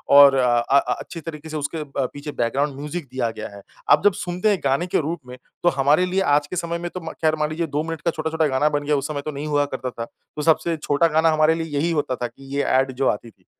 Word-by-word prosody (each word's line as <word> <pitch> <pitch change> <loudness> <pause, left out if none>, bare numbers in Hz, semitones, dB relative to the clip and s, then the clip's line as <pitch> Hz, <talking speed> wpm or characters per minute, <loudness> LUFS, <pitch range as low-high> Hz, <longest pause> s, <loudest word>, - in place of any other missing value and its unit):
और 140 -1 +9
अ 125 -2 +3
अ 140 +4 +4 0.2
अच्छी 165 - -8
तरीके 160 -1 -8
से 155 - -4
उसके 155 +2 -3
प 135 -3 -3
पीछे 145 +1 -6
बैकग्राउंड 135 +4 -1
म्यूज़िक 150 +2 -5
दिया 125 -3 -1
गया 110 - -7
है। 100 - -11 0.3
अब - - +6
जब 205 - +6
सुनते 180 +1 -1
हैं 200 - +2
गाने 140 +7 +1
के - - +1
रूप 160 +3 -3
में, 125 0 -9 0.3
तो 175 - +6
हमारे 145 +5 +3
लिए 190 +2 0 0.2
आज 150 - -2
के 180 - -6
समय 170 0 -2
में 175 - -4
तो 180 - -4
म 160 - -6
खैर 155 -1 +3
मान 150 0 +1
लीजिए 165 +1 -2
2 150 - +1
मिनट 165 -1 -5
का 170 -1 +1
छोटा-छोटा 160 0 0
गाना 140 +2 +2
बन 145 -1 -1
गया 150 0 +2
उस 140 - -2
समय 145 -2 -3
तो 155 - -2
नहीं 145 +2 -5
हुआ 145 -1 +2
करता 130 -1 -4
था। 115 -1 -5
तो 150 - -11
सबसे 165 +1 +2
छोटा 150 +2 +2
गाना 160 +1 +3
हमारे 155 +1 +3
लिए 165 0 -3
यही 170 +3 +1
होता 145 -5 0
था 125 - -3
कि 135 +3 -10
ये 140 - +1 0.2
एड 135 0 0
जो 135 +1 0
आती 115 +3 -3
थी। - - -35
150 Hz, 280 wpm, -22 LUFS, 140-165 Hz, 0.3 s, और